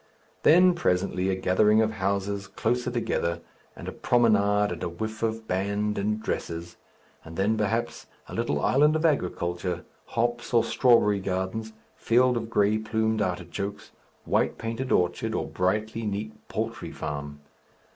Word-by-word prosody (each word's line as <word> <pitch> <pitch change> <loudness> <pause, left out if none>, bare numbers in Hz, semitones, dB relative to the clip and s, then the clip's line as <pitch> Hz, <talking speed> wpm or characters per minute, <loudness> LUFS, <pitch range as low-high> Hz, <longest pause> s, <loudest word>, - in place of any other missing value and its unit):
Then 180 +3 +6
presently 95 - 0
a 95 - +1
gathering 105 +4 +3
of 110 0 +2
houses 100 -1 -2
closer 120 +5 -1
together, 85 -8 -1 0.4
and - - -9
a - - -3
promenade 105 -4 +3
and 85 -2 -5
a - - -2
whiff 110 +6 -5
of 110 0 -2
band 100 +3 -1
and 105 +2 0
dresses, 85 -4 -4 0.5
and 80 0 -10
then, 100 +3 +2
perhaps, 110 +2 -2 0.2
a - - -10
little 75 - -1
island 150 +3 +4
of 160 +1 0
agriculture, 90 - -1 0.2
hops, 120 +1 -1
or 115 - +5
strawberry 115 -5 +4
gardens, 95 +4 -3 0.2
fields 125 +1 +3
of 115 -1 -4
grey 105 -1 +2
plumed 110 0 0
artichokes, 95 +2 -4 0.3
white - - +1
painted 115 +3 -4
orchard, 90 +6 +1
or - - -1
brightly 110 +4 -1
neat 105 +2 -3
poultry 110 -6 -4
farm. 75 -1 -5
105 Hz, 145 wpm, -26 LUFS, 95-115 Hz, 0.5 s, Then